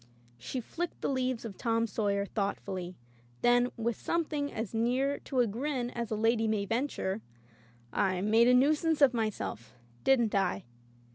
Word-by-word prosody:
'' 120 0 -30
She 260 - -2
flicked 345 +8 -5
the - - 0
leaves 255 -3 -1
of 205 -4 -7
"Tom 230 -1 +1
Sawyer" 200 -2 0
thoughtfully, 195 -3 -3 0.5
then, 245 0 +4
with 230 0 -1
something 300 -2 -1
as 225 -1 -4
near 255 +5 +1
to 260 -3 0
a - - +4
grin 245 +3 -2
as 235 -2 -4
a 220 - -1
lady 225 +1 +2
may 215 -2 0
venture: 225 -3 -1 0.7
"I 190 -2 +1
made 220 +4 +4
a 250 - +6
nuisance 305 +4 +3
of 280 -4 +6
myself, 125 - -3 0.3
didn't 240 -5 +3
I 145 - +1
230 Hz, 160 wpm, -31 LUFS, 205-260 Hz, 0.7 s, a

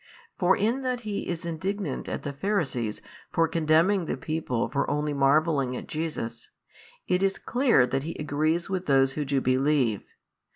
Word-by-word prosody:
For 185 +1 +3
in 230 +6 +1
that 255 -2 -2
he 210 -3 -4
is 170 0 -4
indignant 190 +5 -3
at - - -4
the 145 - -4
Pharisees 140 - -2 0.3
for 165 0 +2
condemning 165 +4 +2
the - - -3
people 140 -4 -2
for 140 - -1
only 150 +1 0
marvelling 140 -1 +2
at - - -8
Jesus, 150 -8 -4 0.6
it 180 0 +2
is 195 0 +1
clear 245 - +3
that 135 +2 -1
he 165 +4 -5
agrees 155 +3 0
with 185 -1 -3
those 135 -1 +4
who 150 - -2
do 140 0 +1
believe. 130 -4 +2
155 Hz, 165 wpm, -27 LUFS, 135-185 Hz, 0.6 s, those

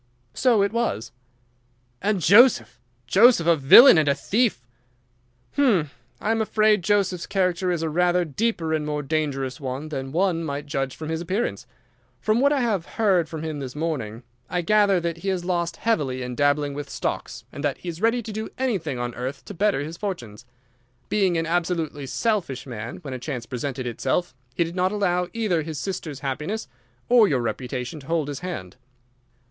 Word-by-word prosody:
"So 235 -6 +3
it 200 - -1
was." 235 - -1 0.9
"And 200 -1 0
Joseph! 165 - +5 0.3
Joseph 195 - +5
a 170 0 +5
villain 160 - +9
and 155 - +1
a 140 - +3
thief!" 200 - 0 0.9
"Hum! 200 - +3 0.3
I 215 - -1
am 225 0 +1
afraid 215 -1 +3
Joseph's 195 -3 +1
character 185 -1 0
is 170 -2 -1
a - - 0
rather 180 +2 +2
deeper 165 - -1
and 155 -1 0
more 150 0 -3
dangerous 135 -4 -2
one 135 +3 -4
than 135 -3 -5
one 170 0 +1
might 145 -1 -4
judge 135 -3 -3
from 155 -1 -7
his 160 0 -2
appearance. 190 +7 -2 0.5
From 215 +2 +1
what 280 +1 +4
I 285 -3 +2
have 210 -8 0
heard 190 -8 +2
from 160 -1 -6
him 155 -2 -4
this 130 -1 -6
morning, 130 -8 -3 0.3
I 180 -1 -1
gather 200 0 +4
that 170 -1 -3
he 180 +4 -8
has 180 -2 -2
lost 170 -2 -1
heavily 135 - 0
in 125 0 -5
dabbling 145 +2 +1
with 145 0 -6
stocks, - - -4
and 145 - -7
that 145 -2 0
he 180 - -7
is 170 +1 -7
ready 230 +2 +2
to 220 - -7
do 220 +1 -4
anything 190 - -1
on 120 0 -3
earth 125 +4 -5
to - - -8
better 200 -5 +1
his 160 +3 -6
fortunes. 125 - -6 0.6
Being 190 -5 +2
an 165 - 0
absolutely 165 -4 -1
selfish 170 - -1
man, 120 -3 -6
when 135 -3 -6
a 130 - -5
chance 125 -3 -5
presented 130 +1 -4
itself 120 +8 -1 0.2
he - - +2
did 170 +1 -6
not 185 0 +1
allow 180 -4 0
either 215 -8 0
his 155 0 -6
sister's 155 -5 -5
happiness 150 +11 -3 0.4
or 240 -3 +6
your 130 -8 +1
reputation 125 +4 -4
to 135 - -14
hold 160 -3 0
his 140 -2 -5
hand." 115 - -6
165 Hz, 185 wpm, -24 LUFS, 140-200 Hz, 0.9 s, villain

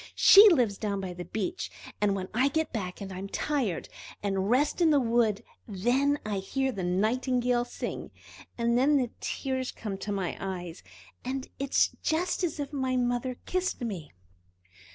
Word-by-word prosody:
She 410 +2 +9
lives 240 - +2
down 200 -2 -1
by 185 -2 -4
the 175 0 -7
beach, 345 +12 -3 0.3
and 205 -1 +3
when 190 -1 -4
I 255 +5 +3
get 315 +3 -1
back 185 -4 -4
and 195 -1 -6
am 190 +2 -6
tired, 250 - -1 0.4
and 195 -1 0
rest 285 +8 +2
in 335 - +5
the 295 -2 +5
wood, 230 -4 +1 0.2
then 245 +8 +1
I 205 -2 -1
hear 265 +7 -1
the 195 -6 -4
Nightingale 240 +6 +1
sing. - - -5 0.5
And 235 0 +1
then 285 +3 +4
the 250 -3 0
tears 260 -1 -2
come 215 - -6
into 195 +2 -5
my 195 -3 -2
eyes, 180 -3 -5 0.4
and 260 +1 -3
it 275 0 -2
is - - +5
just 350 +4 0
as 320 -3 -1
if 285 0 -4
my 260 -2 0
mother 245 0 0
kissed 370 -5 -1
me!" 190 -11 -5
240 Hz, 175 wpm, -28 LUFS, 195-270 Hz, 0.5 s, She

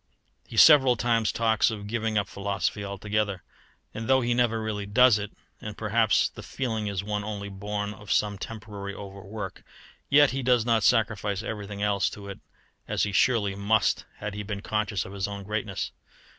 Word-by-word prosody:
He 115 - -8
several 135 -2 +8
times 115 -3 +1
talks 110 -1 +2
of 105 -3 -5
giving 110 0 -1
up 100 -2 +1
philosophy 100 +1 -2
altogether; 100 -1 -2 0.5
and 110 0 -5
though 130 0 +4
he 120 0 +1
never 120 -2 +2
really 105 -2 -3
does 120 +1 +5
it, 105 0 -5 0.3
and 105 -1 -7
perhaps 110 +1 +2
the - - -11
feeling 110 -5 -3
is 100 -2 -2
one 105 0 -2
only 100 -1 -5
born 105 +1 -4
of 105 -1 -9
some 105 -2 +1
temporary 105 -3 -7
overwork, 100 0 -8 0.5
yet 145 0 +6
he 135 - -2
does 125 -3 +3
not 115 -2 +3
sacrifice 110 -4 +1
everything 105 -2 -5
else 100 -2 +2
to 100 -1 -9
it 100 - -8 0.5
as - - 0
he 105 - 0
surely 105 -1 +2
must 100 +1 +1
had 105 0 -5
he 105 - -4
been 100 0 -5
conscious 105 -2 -1
of 95 - -9
his 100 -1 -2
own 100 -1 -6
greatness. 105 +2 -3
105 Hz, 180 wpm, -27 LUFS, 100-115 Hz, 0.5 s, several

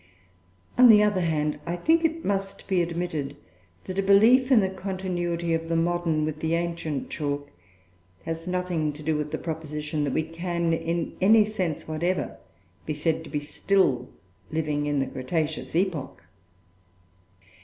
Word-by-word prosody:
On 250 -1 +9
the 210 -2 +8
other 205 -3 +2
hand, 150 -3 0
I 170 - -1
think 325 - +2
it 325 0 0
must 195 -1 -2
be 190 -2 +2
admitted 165 -4 -3 0.5
that 185 +1 -4
a - - +4
belief 225 +7 +5
in 250 - +7
the 190 - +1
continuity 180 -3 -2
of 165 0 -2
the 165 - +1
modern 165 -2 +1
with 155 0 -4
the 160 +1 0
ancient 165 -4 -3
chalk 145 -1 -3 0.7
has 165 +1 -4
nothing 180 -4 -1
to 150 +1 -10
do 155 +1 +1
with 150 0 -2
the - - -3
proposition 150 -2 -3
that 140 - -2
we 160 - +1
can, 170 +1 -2
in 165 +1 -2
any 215 +3 +6
sense 185 -7 -3
whatever, 170 +4 -1 0.5
be 155 - -1
said 160 +1 0
to - - -10
be 150 - -1
still 145 -3 +1 0.4
living 150 -2 -1
in 145 -1 0
the 135 - +1
Cretaceous 155 +5 -3
epoch. 170 - -1
165 Hz, 160 wpm, -26 LUFS, 155-185 Hz, 0.7 s, On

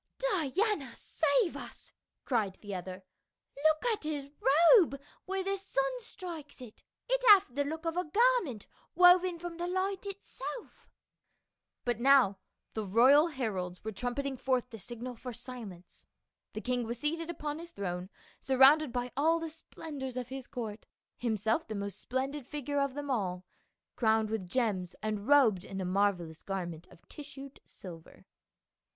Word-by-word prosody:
" - - -52 0.3
Diana 315 - 0
save 330 +6 +1
us - - -10
!" - - -58
cried 215 -7 0
the 205 -1 -6
other, 185 +1 -6 0.3
" 280 - -16
look 315 +3 +3
at 420 - -5
his 290 -2 -4 0.4
robe 320 - +4 0.3
where 385 0 -2
the 395 +1 -1
sun - - -1
strikes 345 - -8
it; 245 -4 -12 0.3
it - - +1
hath 395 -10 +7
the 285 +2 +1
look 320 +3 -5
of 330 0 -1
a 360 - 0
garment 400 - +2 0.3
woven 360 0 +6
from 340 0 -7
the 345 +1 -2
light 380 +2 -1
itself" 400 +4 -8 1.0
But 240 -2 0
now 250 -7 +5 0.3
the 220 - -2
royal 255 - +6
heralds 200 - -4
were 220 - -3
trumpeting 255 +6 -3
forth 250 -1 0
the 225 - -8
signal 240 +5 -7
for 250 +1 -7
silence; 230 -7 -9 0.5
the 215 - -4
king 250 0 -1
was 235 +1 -3
seated 325 +5 -2
upon 300 -2 -4
his 340 +1 -9
throne 180 - -4 0.3
surrounded 270 +2 +5
by 245 0 -2
all 320 +4 +3
the 330 0 -4
splendors 290 -4 -7
of 250 -1 -4
his 265 -1 -7
court, 220 -3 -6 0.3
himself 225 - 0
the 220 - -4
most 200 0 -4
splendid 265 +1 -3
figure 290 -1 -2
of 280 -1 0
them 290 -1 -3
all, 185 -6 -2 0.5
crowned 220 -2 +2
with 200 -5 -3
gems 195 -6 -1
and 215 -1 -2
robed 250 -11 +5
in 195 -1 -6
a 190 - -2
marvelous 180 -4 0
garment 175 -4 -5
of 175 - -20
tissued 275 -2 -10
silver. 165 -4 -12
260 Hz, 160 wpm, -31 LUFS, 215-320 Hz, 1.0 s, hath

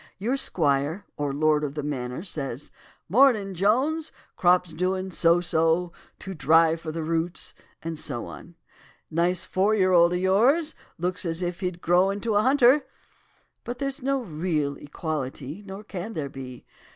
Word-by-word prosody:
Your 230 +7 -1
squire, 150 - 0
or 145 -1 -2
lord 150 +1 +2
of 145 -1 -3
the 150 - -3
manor, 130 0 -4
says 145 -7 -4 0.4
'Mornin', 215 -2 +4
Jones! 260 - +1 0.2
crops 180 -1 +3
doin' 185 +3 -1
so 170 0 +3
so, 165 +1 +1 0.3
too 190 - -7
dry 165 0 +4
for 165 -1 -6
the 165 0 -4
roots,' 165 +2 -2 0.3
and 165 -1 -4
so 120 -5 -4
on. 175 - -11 0.6
'Nice 170 +2 +1
four 200 +3 +1
year 185 -3 +3
old 170 -1 +5
of 180 - 0
yours. 245 - +3 0.2
Looks 180 +2 -1
as 165 0 -1
if 175 -1 -3
he'd 180 -2 -4
grow 180 +3 +3
into 205 +3 -2
a 205 - +4
hunter.' 265 +3 +5 0.8
But 245 +1 -5
there's 275 +1 -3
no 270 0 0
real 155 -5 -2
equality, 145 +1 -5
nor 195 +2 -8
can 205 +1 -6
there 145 -6 -3
be. 130 -2 -9
175 Hz, 160 wpm, -25 LUFS, 155-200 Hz, 0.8 s, old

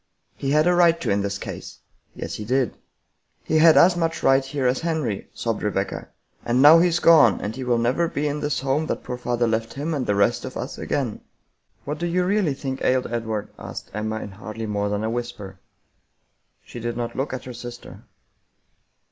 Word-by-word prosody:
" - - -50
He 135 - -3
had 150 +2 +4
a 180 - +4
right 170 -1 +4
to 165 - -1
in 100 0 +2
this 100 0 -2
case." - - -8 0.2
" - - -42
Yes, - - -5
he 105 - -5
did." 125 +2 0 0.3
" - - -49 0.3
He 155 - +1
had 160 0 +7
as 175 +1 +6
much 165 -1 0
of - - -10
a - - -1
right 135 0 +5
here 135 0 -3
as 125 +1 +2
Henry," 155 -11 -2
sobbed 115 -2 -3
Rebecca, 100 -1 -2 0.2
" - - -40
and 120 +1 +1
now 150 +4 +9
he's 175 0 +3
gone, 155 - +6
and 105 +2 -4
he 130 - -5
will 120 -1 +1
never 125 +9 +1
be 150 -2 -2
in 145 +1 -2
this 145 -2 -1
home 140 +4 0
that - - -3
poor 125 - -4
father 120 -1 0
left 115 0 -1
him 150 +4 -2
and 135 -4 -2
the 105 - +2
rest 100 0 +2
of - - -6
us - - -6
again." - - -2 0.3
" - - -42
What 150 +2 -4
do 175 - -1
you 180 +1 +1
really 190 -7 +1
think 135 -1 -5
ailed 130 -2 +1
Edward? 110 -3 -3
" - - -19
asked - - -8
Emma 110 +1 -3
in 105 - -7
hardly 110 +3 -7
more 105 -1 -1
than 105 +1 -2
a 110 - -1
whisper. 120 -6 -6 1.1
She - - -9
did 120 0 -4
not 120 -1 -4
look 135 +3 -2
at 130 - -5
her 125 - -7
sister. 120 0 -9
125 Hz, 230 wpm, -23 LUFS, 110-155 Hz, 1.1 s, now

